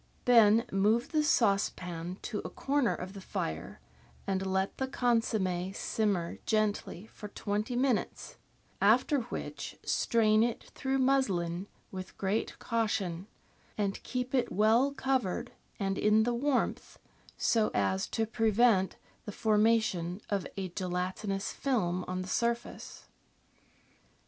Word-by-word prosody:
Then 230 -1 +6
move 215 +6 +2
the 310 -2 +2
saucepan 185 - 0
to 215 - -3
a - - -5
corner 280 -3 0
of 185 +1 -7
the 195 - -9
fire, 80 - -4 0.5
and 190 -1 -1
let 190 0 -1
the 265 - 0
consomm^ 210 -7 0
simmer 200 -6 -1
gently 215 -3 0
for 215 -1 -10
twenty 210 +3 -3
minutes, 255 -2 -1 0.4
after 250 +8 +4
which 235 - -6
strain 215 -2 +3
it 235 0 0
through 265 0 -1
muslin 195 -10 +1 0.2
with 185 -1 -8
great 200 +3 -1
caution, 205 -6 -1 0.5
and 200 -2 -1
keep 250 0 -4
it 255 -2 +1
well 225 +7 +4
covered 265 -8 -1 0.3
and 195 -1 -1
in 215 +1 +4
the 240 +2 0
warmth, 265 +2 -1 0.4
so 225 -2 +2
as 95 -1 +1
to 225 - -1
prevent 220 -3 +3 0.3
the 210 - -5
formation 210 -5 +2
of 200 -2 0
a 190 -2 -3
gelatinous 185 +2 -3
film 185 -10 0
on 185 0 -3
the - - -8
surface. 235 +3 -2
210 Hz, 125 wpm, -31 LUFS, 190-235 Hz, 0.5 s, Then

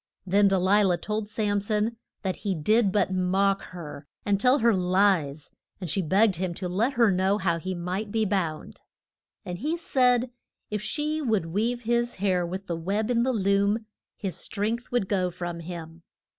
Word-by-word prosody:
Then 200 +2 +4
De 195 0 +3
li 195 +3 +4
lah 185 -3 +3
told 210 +3 -3
Sam 205 -2 0
son 215 +2 0 0.3
that 190 -2 -1
he 195 -2 -2
did 205 +6 +3
but 195 -2 +1
mock 195 +2 +2
her 150 -5 -9 0.2
and 200 -1 +1
tell 255 +3 +5
her 235 -4 +4
lies, 180 -6 +1 0.3
and 180 -6 -4
she 195 - +1
begged 190 +3 +3
him 180 -1 -2
to 185 - -4
let 215 +9 0
her 235 -4 +4
know 190 +2 +2
how 170 -4 0
he 185 +2 -4
might 185 +4 -3
be 220 0 +1
bound. 175 -6 -2 0.6
And 175 -2 -5
he 310 +6 -1
said 250 -6 +2 0.4
if 210 -1 -2
she 300 +8 -2
would 220 - +1
weave 240 +4 0
his 240 +1 0
hair 185 -3 +1
with 190 +3 -5
the 170 - -3
web 200 +7 -1
in 235 -1 +2
the 260 +2 +2
loom 200 0 +1 0.3
his 195 -4 -4
strength 225 +4 -3
would 245 -6 +1
go 185 -2 +1
from 175 -1 -5
him. 165 -1 -8
200 Hz, 185 wpm, -26 LUFS, 180-220 Hz, 0.6 s, tell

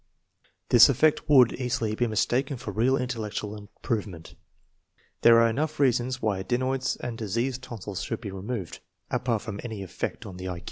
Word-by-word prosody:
This 120 +3 +8
effect 150 +4 +2
would 130 -5 +6
easily 120 -4 -2
be 120 +2 0
mistaken 130 +5 0
for 125 - -6
real 130 +5 +2
intellectual 110 -4 -4
improvement. 105 -4 -5 0.9
There 115 0 +7
are 115 - +5
enough 145 +8 -2
reasons 130 -1 +2
why 105 -5 0
adenoids 130 +5 -1
and 120 -2 -6
diseased 120 +5 -2
tonsils 105 -7 -6
should - - -4
be 105 -4 -6
removed, 95 0 -5 0.3
apart 115 -4 0
from 105 -3 -6
any 110 -5 -5
effect 95 - -5
on 90 -1 -9
thelQ. 90 -1 -5
115 Hz, 155 wpm, -27 LUFS, 105-130 Hz, 0.9 s, This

